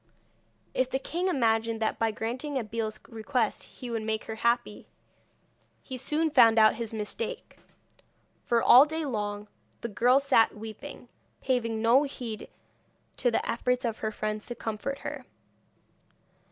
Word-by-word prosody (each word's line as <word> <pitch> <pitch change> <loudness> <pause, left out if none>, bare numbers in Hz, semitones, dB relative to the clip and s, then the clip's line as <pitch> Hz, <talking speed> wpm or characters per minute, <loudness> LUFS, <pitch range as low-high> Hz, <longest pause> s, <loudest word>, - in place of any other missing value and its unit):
If 255 0 +1
the 265 - 0
king 340 +7 -2
imagined 230 -7 +1
that 220 - -1
by 225 - +2
granting 245 +7 -3
Abeille's 220 -2 -3
request 225 0 -2
he 250 -2 -9
would 225 -1 -2
make 220 0 -2
her 220 - -6
happy, 235 -1 -1 1.0
he 260 - -6
soon 300 +5 0
found 230 -5 +6
out 215 -1 +7
his 230 -2 -3
mistake, 230 - -5 0.8
for 235 -1 +1
all 265 +5 +8
day 315 +1 -3
long 210 -4 -3 0.3
the - - -3
girl 245 +5 +4
sat 265 -6 +3
weeping, 220 0 -9 0.3
paving 230 -4 -1
no 240 +4 +6
heed 245 -6 -5 0.7
to 245 - +2
the 230 - -1
efforts 250 +2 0
of 225 -2 -2
her 215 - -2
friends 215 0 -4
to 240 - -5
comfort 225 +6 -4
her. - - -5
230 Hz, 145 wpm, -28 LUFS, 220-260 Hz, 1.0 s, all